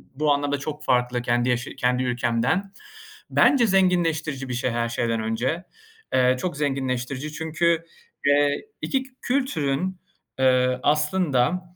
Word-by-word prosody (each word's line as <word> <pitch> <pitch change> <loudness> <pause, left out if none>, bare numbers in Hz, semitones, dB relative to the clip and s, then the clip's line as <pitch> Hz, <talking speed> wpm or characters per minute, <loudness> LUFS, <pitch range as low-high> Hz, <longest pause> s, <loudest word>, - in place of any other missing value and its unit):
bu 150 +1 +2
anlamda 145 0 0
çok 150 +1 -6
farklı 125 -2 +1
kendi 120 +1 +1
yaş 120 -1 0
kendi 125 +1 +1
ülkemden. 125 +10 0 0.6
Bence 245 -5 +4
zenginleştirici 165 -8 +1
bir - - -2
şey 125 0 -1
her 115 0 -1
şeyden 115 -1 -1
önce. 120 +10 -1 0.5
Eee, 125 0 +4
çok 175 0 -3
zenginleştirici 135 0 -2
çünkü, 160 +1 0 0.4
eee, 145 - +3 0.2
2 270 -1 0
kü 260 -1 -18
kültürün, 185 - -1 0.4
eee, 130 -1 +3
aslında, 150 0 +2
140 Hz, 130 wpm, -24 LUFS, 125-165 Hz, 0.6 s, Bence